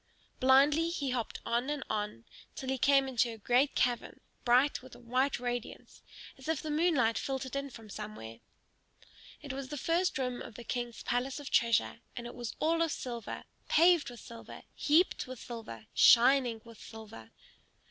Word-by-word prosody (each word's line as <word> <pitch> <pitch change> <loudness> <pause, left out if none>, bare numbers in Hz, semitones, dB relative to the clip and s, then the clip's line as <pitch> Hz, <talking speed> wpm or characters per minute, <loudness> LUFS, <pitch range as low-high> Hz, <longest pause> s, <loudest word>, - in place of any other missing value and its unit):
Blindly 285 +5 +5
he 285 -6 -2
hopped 245 -3 -3
on 240 +3 0
and 295 -2 -2
on, 210 - -3 0.3
till 265 - -5
he 265 -1 -1
came 275 +1 +4
into 245 -2 +1
a 225 - -8
great 245 +6 +2
cavern, 245 -1 0 0.2
bright 250 +4 +3
with 260 0 -13
a - - -14
white 255 +3 0
radiance, 245 -1 -5 0.4
as 265 - -11
if 320 -2 0
the 310 - -4
moonlight 295 -8 +2
filtered 265 -1 -4
in 280 0 -3
from 225 -4 -12
somewhere. 200 - -8 1.0
It 285 -2 -5
was 270 0 -5
the 295 +2 -6
first 340 +4 +1
room 250 -2 -2
of 220 - -9
the 240 - -9
King's 240 -1 -4
palace 250 +4 -1
of 285 - -8
treasure; 230 -2 +2 0.2
and 240 - -5
it 240 - -7
was 240 -2 -6
all 330 +1 +2
of 330 -2 +1
silver, 240 -4 -5 0.3
paved 340 -2 +5
with 240 -2 -11
silver, 230 -1 -11
heaped 315 +1 +2
with 255 0 -7
silver, 220 - -8
shining 245 -2 +5
with 230 -1 -14
silver. 215 - -11
255 Hz, 175 wpm, -31 LUFS, 235-280 Hz, 1.0 s, Blindly